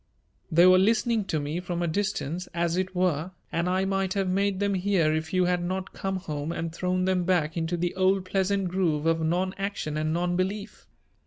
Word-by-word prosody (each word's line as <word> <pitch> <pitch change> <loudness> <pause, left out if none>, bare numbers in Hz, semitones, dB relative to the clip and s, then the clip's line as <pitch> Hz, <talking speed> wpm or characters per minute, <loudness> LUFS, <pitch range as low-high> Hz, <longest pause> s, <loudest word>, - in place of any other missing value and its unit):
"They 170 +2 +6
were 185 0 +7
listening 220 +1 +2
to 160 -5 -1
me 150 +4 -3
from 175 -1 -3
a - - 0
distance, 180 -2 -2
as 170 0 0
it 185 0 -2
were 180 -1 0 0.2
and 170 +2 0
I 190 +1 +1
might 195 0 -1
have 195 -1 0
made 195 +1 +1
them 200 0 +1
hear 180 -5 +2
if 160 +1 -2
you 185 -1 +2
had 180 -1 +1
not 185 +1 -3
come 195 0 -3
home 155 -4 -4
and 165 -1 -4
thrown 180 +1 0
them 185 -1 +1
back 170 -3 +1
into 165 +1 -1
the 175 +1 -1
old 190 0 +2
pleasant 195 0 0
groove 170 -5 0
of 165 0 +2
non 180 +4 0
action 195 -6 -3
and 155 0 0
non 175 +2 0
belief. 200 +3 -3
180 Hz, 210 wpm, -27 LUFS, 170-190 Hz, 0.2 s, were